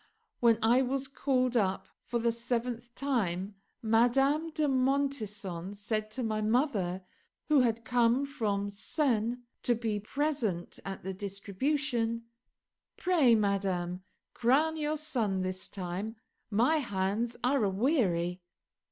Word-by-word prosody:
When 230 -2 +5
I 240 +3 +5
was 265 +1 -1
called 255 -2 0
up 195 -4 +1 0.2
for 240 - -2
the 235 0 +2
seventh 240 0 -3
time 205 -8 -1 0.3
Madame 270 +8 +3
de 310 -1 0
Montesson 220 -9 -1
said 215 +1 -2
to 250 +4 -4
my 215 -1 -1
mother, 215 - +1 0.5
who 300 -2 +6
had 230 -2 +1
come 245 +3 +3
from 205 -8 -2
Sens 235 +1 0 0.2
to 240 - +3
be 220 -2 -2
present 225 - -2
at 195 0 -6
the 190 +1 -3
distribution, 230 +5 -1 0.7
"Pray, 315 -11 +4
madame, 190 -4 0 0.3
crown 280 +7 +3
your 305 0 -1
son 230 -11 -1
this 185 0 -4
time; 195 +4 -4 0.3
my 240 +9 +3
hands 220 -1 -1
are 255 -1 +3
a 200 - +3
weary." 190 - +1
230 Hz, 125 wpm, -30 LUFS, 200-265 Hz, 0.7 s, who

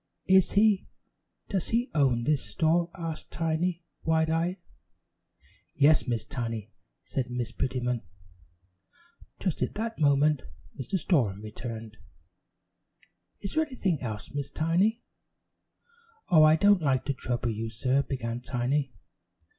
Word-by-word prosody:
"Is 190 -1 +4
he? 205 -1 +4 0.6
Does 190 -4 -1
he 240 +3 0
own 130 -6 +2
this 150 +1 +1
store?" 170 +2 +1
asked 165 -3 -5
Tiny, 165 +1 -1 0.2
wide 160 0 +2
eyed. 170 +3 0 1.2
"Yes, 145 0 +4
Miss 115 -3 -1
Tiny," 115 -4 -4 0.3
said 130 -3 -3
Miss 125 -1 -3
Prettyman. 125 -2 -1 1.4
Just 185 -5 -2
at - - -1
that 225 +1 -3
moment 145 0 +3 0.3
Mr. 130 +8 -2
Storem 120 - +1
returned. 110 0 -7 1.4
"Is 200 - -5
there 315 - +3
anything 195 - -1
else, 110 -2 -5
Miss 145 -1 -3
Tiny?" 185 +9 +1 1.3
"Oh, 165 -5 +7
I 155 0 +7
don't 200 +2 +5
like 135 -3 +1
to 140 - 0
trouble 120 -2 -2
you, 110 +1 -3
sir," 130 +4 +1
began 120 -4 -4
Tiny. 125 +1 -1
145 Hz, 125 wpm, -28 LUFS, 120-170 Hz, 1.4 s, Oh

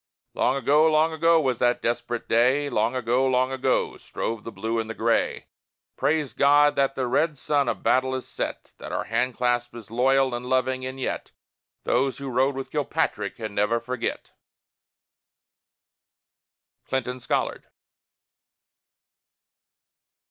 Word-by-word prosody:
Long 130 - +1
ago, 150 +4 +4
long 155 +1 +3
ago, 165 +1 +4
was 130 -6 0
that 120 0 +1
desperate 120 0 -2
day! 130 +5 +2
Long 110 +4 +1
ago, 125 +2 +1
long 130 0 +2
ago, 130 0 0
strove 115 -2 -4
the 115 - -7
Blue 115 +1 -2
and 110 0 -3
the 115 - -5
Gray! 115 +1 0 0.5
Praise 150 -6 0
God 145 +3 +4
that 135 -1 +1
the 130 - -1
red 150 +4 +1
sun 140 -2 +1
of - - -4
battle 130 0 +2
is 130 - -5
set! - - -5
That - - -8
our - - -1
hand 125 +2 -1
clasp 120 -1 0
is 110 -3 -11
loyal 130 +2 +2
and 120 +1 -4
loving 130 0 0
and 130 +1 -7
yet, - - -3 0.5
Those 130 +2 +1
who 140 -1 -5
rode 130 +3 +2
with 135 0 -6
Kilpatrick 145 -8 -1
can 110 -2 -6
never 105 +3 +1
forget! 125 +2 -4 2.6
CLINTON 130 -1 -2
SCOLLARD. - - -2
130 Hz, 140 wpm, -25 LUFS, 120-140 Hz, 2.6 s, ago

